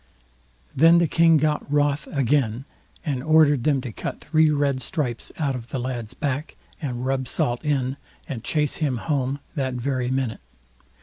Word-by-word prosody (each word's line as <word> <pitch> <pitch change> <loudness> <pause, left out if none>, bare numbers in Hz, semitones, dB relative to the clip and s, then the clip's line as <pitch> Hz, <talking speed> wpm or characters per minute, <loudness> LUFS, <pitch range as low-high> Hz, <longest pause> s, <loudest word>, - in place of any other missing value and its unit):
Then 165 +4 +6
the 170 - +4
King 165 +1 +5
got 150 -1 0
wroth 145 0 +1
again, 135 -3 0 0.4
and 140 -5 -1
ordered 150 -3 +4
them 140 -3 +2
to 125 -3 -6
cut - - -5
three 160 -1 +3
red 140 -3 +1
stripes 130 -10 -3
out 145 -4 0
of 120 -2 -6
the 135 - -4
lad's 120 -2 -4
back, 145 +1 -3 0.3
and 125 -4 -3
rub 130 -1 -1
salt 120 +3 -1
in, 135 -3 0 0.3
and 120 -5 -5
chase 150 +2 0
him 140 -6 0
home 135 0 -1 0.2
that 130 -3 -2
very 125 0 -1
minute. 130 -4 -2
140 Hz, 165 wpm, -24 LUFS, 125-150 Hz, 0.4 s, Then